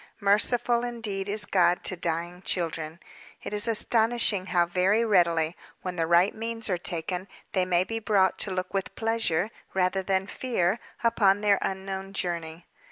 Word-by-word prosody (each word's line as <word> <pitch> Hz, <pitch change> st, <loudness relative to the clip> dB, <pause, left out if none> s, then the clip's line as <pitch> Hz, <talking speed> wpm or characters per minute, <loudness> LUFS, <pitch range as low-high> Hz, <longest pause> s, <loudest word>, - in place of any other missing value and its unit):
Merciful, 235 Hz, +4 st, +2 dB
indeed, 215 Hz, -5 st, -4 dB
is 210 Hz, 0 st, -1 dB
God 180 Hz, -3 st, +2 dB
to 185 Hz, -, 0 dB
dying 170 Hz, +1 st, -3 dB
children! 165 Hz, -3 st, -3 dB, 0.4 s
It -, -, -6 dB
is 210 Hz, +2 st, +2 dB
astonishing 225 Hz, -3 st, +2 dB
how 175 Hz, -2 st, +2 dB
very 185 Hz, +6 st, +2 dB
readily, 170 Hz, -5 st, +2 dB, 0.3 s
when 185 Hz, -1 st, -4 dB
the 165 Hz, -2 st, -1 dB
right 175 Hz, +4 st, +4 dB
means 225 Hz, -1 st, -3 dB
are 180 Hz, -, +1 dB
taken, 175 Hz, +2 st, -2 dB, 0.2 s
they 185 Hz, -2 st, +1 dB
may 180 Hz, 0 st, +3 dB
be 225 Hz, +4 st, -4 dB
brought 200 Hz, -4 st, +2 dB
to -, -, -1 dB
look 185 Hz, 0 st, -3 dB
with 195 Hz, -1 st, -3 dB
pleasure, 225 Hz, -4 st, 0 dB, 0.2 s
rather 190 Hz, +1 st, +1 dB
than 190 Hz, 0 st, 0 dB
fear, 205 Hz, -3 st, -1 dB, 0.2 s
upon 205 Hz, -4 st, +3 dB
their 205 Hz, -2 st, +3 dB
unknown 190 Hz, 0 st, -4 dB
journey. 170 Hz, -2 st, -4 dB
190 Hz, 160 wpm, -27 LUFS, 175-215 Hz, 0.4 s, right